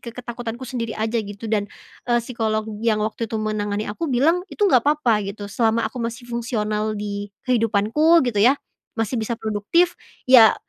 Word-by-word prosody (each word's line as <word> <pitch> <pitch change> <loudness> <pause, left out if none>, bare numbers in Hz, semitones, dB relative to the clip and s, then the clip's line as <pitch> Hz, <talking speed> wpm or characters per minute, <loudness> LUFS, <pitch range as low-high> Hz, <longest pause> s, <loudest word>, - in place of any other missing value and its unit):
ke - - -9
ketakutanku 240 0 -6
sendiri 230 -3 -3
aja 220 +2 0
gitu 205 +1 -7
dan, 210 -2 +1 0.4
eee, 240 0 +3
psikolog 220 -2 -1 0.2
yang 215 -2 +2
waktu 225 +2 -2
itu - - -6
menangani 210 -1 -2
aku 270 +11 -3
bilang 315 +8 +3
itu 415 - +1
nggak 250 - +5
apa-apa 245 -9 +2
gitu 205 0 -6
selama 225 +1 +1
aku 235 - -9
masih 230 +1 -4
fungsional 215 -3 -1
di 205 0 -4 0.2
kehidupanku 235 +8 +3
gitu 215 -4 -1
ya, 255 +5 +6 0.4
masih 225 +3 0
bisa 220 +2 -2
produktif 220 +12 +1 0.4
ya 230 -4 +9
225 Hz, 170 wpm, -22 LUFS, 215-245 Hz, 0.4 s, ya